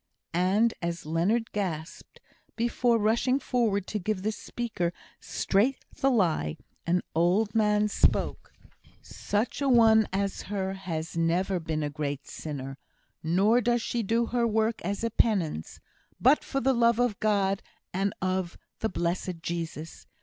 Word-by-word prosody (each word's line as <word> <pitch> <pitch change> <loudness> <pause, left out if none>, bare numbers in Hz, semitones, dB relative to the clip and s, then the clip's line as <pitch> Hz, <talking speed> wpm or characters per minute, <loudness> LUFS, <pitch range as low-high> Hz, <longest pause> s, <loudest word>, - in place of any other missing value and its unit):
And 195 +6 +3
as 170 -1 -3
Leonard 185 +9 0
gasped, 175 -4 -5 0.4
before 235 0 +2
rushing 230 +4 +2
forward 220 -8 0
to 210 - -3
give 190 0 -2
the 215 - +1
speaker 215 -6 -3 0.3
straight 225 +8 0
the 270 - +1
lie, 170 - +1 0.3
an 180 +1 +2
old 185 +6 +2
man 210 -1 +3
spoke: 210 - 0 0.5
"Such 210 +7 -2
a 280 - +2
one 225 -3 +6
as 195 +1 -1
her 190 -2 -2
has 170 -4 -5
never 175 +3 +1
been 160 -2 -2
a 145 - -2
great 145 -2 -4
sinner; 135 -3 -6 0.4
nor 195 +9 +3
does 240 0 +1
she 240 - -1
do 230 +3 +1
her 235 0 +1
work 220 +1 0
as 200 +4 -2
a 230 - 0
penance, 180 - 0 0.4
but 265 +5 +5
for 275 - -2
the 270 +1 +2
love 235 -1 +3
of 245 -4 +1
God, 200 -2 +1 0.3
and 195 +2 0
of 185 -2 -1 0.2
the 220 - 0
blessed 175 0 -2
Jesus. 165 -2 -5
200 Hz, 145 wpm, -28 LUFS, 170-230 Hz, 0.5 s, one